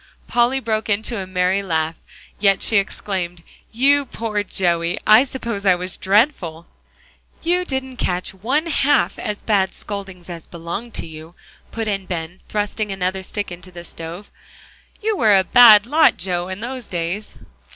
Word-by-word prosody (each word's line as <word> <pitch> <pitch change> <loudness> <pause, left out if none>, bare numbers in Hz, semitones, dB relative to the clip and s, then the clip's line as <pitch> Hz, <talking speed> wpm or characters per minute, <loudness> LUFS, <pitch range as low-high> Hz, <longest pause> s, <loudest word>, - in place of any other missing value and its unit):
Polly 245 +2 +2
broke 220 -3 -2
into 215 +2 0
a 190 - -5
merry 185 +1 +1
laugh; 160 -4 -1 0.4
yet 195 -1 +4
she 220 - +3
exclaimed, 185 -3 -2 0.3
"You 280 +4 +3
poor 225 -4 -3
Joey, 175 -4 0
I 215 +4 +7
suppose 235 -6 -5
I 190 -2 +5
was 180 +1 -5
dreadful!" 190 - +1 0.8
"You 355 +2 +1
didn't 265 -3 -4
catch 180 -3 -2
one 255 - 0
half 290 -4 +2
as 210 -1 -4
bad 195 -3 +1
scoldings 195 -4 -7
as 170 -2 -8
belonged 175 +8 -6
to - - -2
you," 160 +1 -11 0.4
put 225 -1 -3
in 195 -2 -2
Ben, 175 +1 -5
thrusting 210 0 -2
another 190 0 -2
stick 205 +1 -4
in 175 0 -8
the 175 -2 -10
stove. 170 +5 -8 0.7
"You 435 0 +1
were 215 - +5
a 190 - +3
bad 220 -2 +8
lot, 310 +6 +4
Joe, 175 -1 -2
in 190 +2 -6
those 250 0 -6
days." 175 +4 -4
200 Hz, 160 wpm, -20 LUFS, 180-230 Hz, 0.8 s, bad